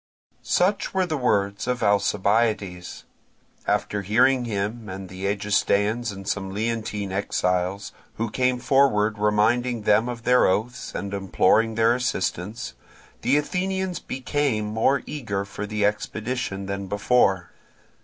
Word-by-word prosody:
Such 195 +2 +1
were 190 -1 +3
the 160 -3 -2
words 100 -6 0
of 125 -1 -1
Alcibiades. 100 -2 +1 0.6
After 105 - 0
hearing 120 +6 +3
him 110 +1 -3
and 95 0 -7
the 95 +1 -4
Egestaeans 105 +2 +1
and 95 0 -9
some 95 -2 -2
Leontine 105 -1 -3
exiles, 90 0 -1 0.2
who 115 -1 -3
came 125 +1 +1
forward 120 -5 +2
reminding 110 +3 +2
them 110 +4 +3
of 120 -1 -6
their 125 +1 +4
oaths 110 +6 -2
and 100 -1 -4
imploring 105 +3 +2
their 115 +1 +4
assistance, 115 -2 -2 0.5
the 145 - +3
Athenians 185 +3 -1
became 130 -4 -1
more 110 +6 +1
eager 100 -9 -3
for 105 +1 -6
the 105 -1 0
expedition 105 -1 -2
than 100 0 -4
before. 100 -4 +2
105 Hz, 125 wpm, -24 LUFS, 100-125 Hz, 0.6 s, their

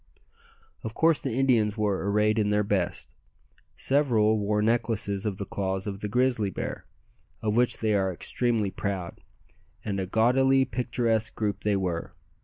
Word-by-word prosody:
Of 110 0 -6
course 160 -2 +4
the 135 -6 -3
Indians 115 -6 +2
were 100 -2 0
arrayed 105 +2 +2
in 105 -1 +1
their 105 0 +2
best. 100 -4 -2 0.6
Several 115 -6 +2
wore 105 +1 0
necklaces 110 -3 0
of 100 -3 -3
the 100 - -4
claws 95 0 -3
of 100 -2 -5
the 105 - -3
grizzly 120 -2 +1
bear, - - -5 0.6
of 105 -1 0
which 125 +1 +2
they 110 -1 0
are 95 -2 +1
extremely 110 +2 -1
proud; 95 -2 -4 0.6
and 100 -2 -2
a 95 - -2
gaudily 130 +5 +3
picturesque 115 -2 -1
group 105 -2 -2
they 105 -1 +1
were. 90 -4 -3
105 Hz, 155 wpm, -27 LUFS, 100-120 Hz, 0.6 s, course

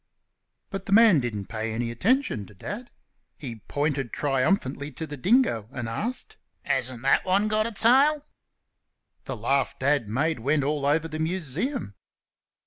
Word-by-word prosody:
But 195 0 -5
the - - -4
man 220 -7 +7
didn't 110 -6 -3
pay 110 +1 -4
any 115 +1 -2
attention 180 - 0
to 105 - -16
Dad. 230 - -6 0.5
He 120 -7 -7
pointed 145 -4 -1
triumphantly 140 0 0
to 160 - -4
the 150 - -7
dingo 145 - +2
and 120 -3 -4
asked, 220 - -4 0.3
"Hasn't 125 -2 -2
that 135 - +3
one 195 +3 +2
got 215 +1 +1
a - - -5
tail?" 275 +7 +4 1.0
The - - -4
laugh 135 +5 0
Dad 140 -3 +1
made 140 +5 0
went 145 +5 +1
all 145 0 0
over 155 +3 +2
the 155 0 -6
Museum. 170 - -2
145 Hz, 150 wpm, -26 LUFS, 120-200 Hz, 1.0 s, man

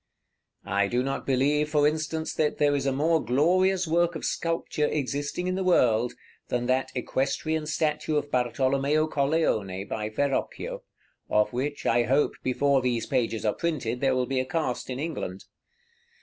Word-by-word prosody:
I 100 0 +1
do 120 +4 0
not 135 +1 -3
believe, 145 +3 +2
for 150 -1 +3
instance, 160 +1 -2
that 150 -1 0
there 145 -1 +3
is 140 -1 -1
a - - +2
more 155 +3 +2
glorious 180 +8 +2
work 170 +1 +2
of - - -4
sculpture 165 -2 -1
existing 145 +4 -2
in 185 - 0
the 190 +1 -1
world 125 -10 +3 0.3
than 120 0 -1
that 130 +1 0
equestrian 140 +5 -1
statue 155 0 0
of 145 -1 -1
Bartolomeo 135 +4 +1
Colleone, 135 - 0
by 105 -1 -3
Verrocchio, 135 +5 -2 0.5
of 105 +1 +2
which, 145 +4 -3
I 120 - +3
hope, 135 +5 +2
before 135 +1 +2
these 120 -2 0
pages 115 -4 -1
are 105 - +2
printed, 130 -8 -2
there 135 -2 +2
will 125 0 +1
be 130 0 -1
a 130 - 0
cast 130 -5 -2
in 125 - -3
England. 140 - -4
140 Hz, 165 wpm, -27 LUFS, 125-155 Hz, 0.5 s, for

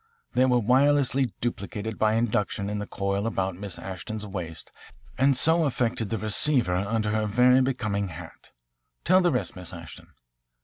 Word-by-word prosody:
They 130 - +4
were 125 -1 +3
wirelessly 130 +1 +3
duplicated 110 -2 -4
by 110 0 +3
induction 105 -3 -1
in 105 - -2
the 105 - -5
coil 100 +2 -2
about 95 -4 -1
Miss 100 0 -7
Ashton's 95 +3 -6
waist 90 -6 -7 0.4
and 135 -1 +3
so 160 +3 +3
affected 120 -5 -1
the 115 - -1
receiver 110 - +1
under 105 +3 -1
her 110 0 0
very 125 +4 +4
becoming 105 -6 -1
hat. 85 -1 -11 0.5
Tell 185 +2 +5
the 175 -1 +3
rest, 125 - -2
Miss 90 -2 -9
Ashton." 85 -3 -11
110 Hz, 160 wpm, -26 LUFS, 100-125 Hz, 0.5 s, Tell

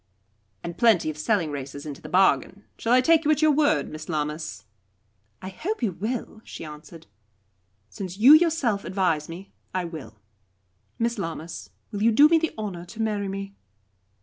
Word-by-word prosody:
'" 105 -2 -44
"And 170 0 -7
plenty 220 -10 +4
of 150 - -12
selling 165 -2 +1
races 140 0 -6
into 145 -2 -7
the 155 - -9
bargain. 190 +2 +2
Shall 230 - -2
I 255 +1 +6
take 325 +4 +4
you 300 - 0
at 310 0 +3
your 310 - +6
word, 295 +1 +2
Miss 155 +1 -9
Lammas?" 150 -8 -3 0.8
"I 190 - -5
hope 330 - -4
you 215 - +1
will," 215 +4 -5
she - - -9
answered. 155 +2 -11 0.8
"Since 185 - -7
you 250 +8 +8
yourself 310 -11 +3
advise 180 -6 0
me, 180 +4 -9 0.2
I 185 -1 0
will. 155 -10 -8 0.8
Miss 235 -1 -1
Lammas, 165 - -6 0.2
will 205 - -4
you 230 +2 +4
do 285 +7 +7
me 330 0 +5
the 325 0 -1
honour 195 -5 -5
to 180 +5 -13
marry 210 -2 -1
me?" 195 0 -5
195 Hz, 175 wpm, -25 LUFS, 155-235 Hz, 0.8 s, you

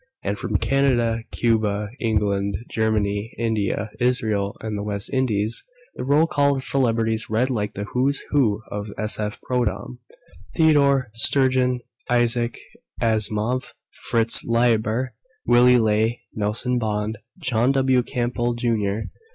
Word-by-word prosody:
And 100 +1 -1
from 110 -3 0
Canada, 120 -3 +1
Cuba, 105 -3 0
England, 100 -3 0 0.2
Germany, 105 -1 -1
India, 110 -2 -1
Israel 110 -5 0
and 110 -1 -4
the 100 - -3
West 100 -1 -3
Indies. 115 -4 0 0.3
The - - -6
roll 145 +4 +4
call 140 -3 +2
of 135 - 0
celebrities 115 -4 +1
read 120 +5 +1
like 105 -3 -2
the 100 - -3
Who's 130 +6 0
Who 110 -7 +2
of 105 0 -4
S.F. 105 0 -1
Prodom: 120 -1 -2 0.6
Theodore 140 -6 +3
Sturgeon, 125 +1 +2 0.3
Isaac 120 0 +1 0.4
Asimov, 110 +2 -1 0.3
Fritz 115 -1 +3
Leiber, 115 +1 +1 0.3
Willy 125 +1 +6
Ley, 110 +1 +1
Nelson 110 +4 0
Bond, 105 -1 -2 0.2
John 120 +1 +1
W. 130 -2 +3
Campbell 120 -1 -2
Jr. 110 -4 0
115 Hz, 120 wpm, -23 LUFS, 105-125 Hz, 0.6 s, Willy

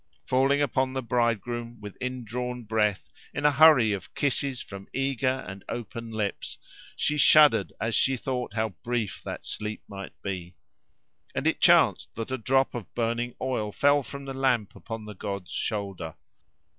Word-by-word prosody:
Falling 135 +2 +3
upon 130 -1 0
the 130 -1 -2
bridegroom, 120 0 -1
with 105 -2 -8
indrawn 125 0 -4
breath, 105 -2 0 0.3
in 145 - -2
a 150 - +7
hurry 140 -7 +7
of 100 - -7
kisses 140 -2 0
from 100 0 -9
eager 135 -1 0
and 95 0 -8
open 115 0 -5
lips, 110 -2 -3 0.4
she 150 - +1
shuddered 150 -8 +6
as 115 +3 -1
she 135 +3 +3
thought 125 -3 -3
how 110 0 +1
brief 120 -4 -2
that - - -6
sleep 105 0 -4
might 100 -1 -9
be. 90 -3 -4 0.8
And - - -1
it - - +1
chanced - - +4
that 115 +3 -5
a 130 - -1
drop 135 +4 +2
of 120 -5 -6
burning 120 +1 -1
oil 115 -5 -1
fell 145 +5 +4
from 140 +1 -8
the 135 - -5
lamp 130 -6 +1
upon 115 -1 -7
the 105 - -7
god's 100 -1 -5
shoulder. 100 -6 -3
120 Hz, 160 wpm, -27 LUFS, 105-130 Hz, 0.8 s, a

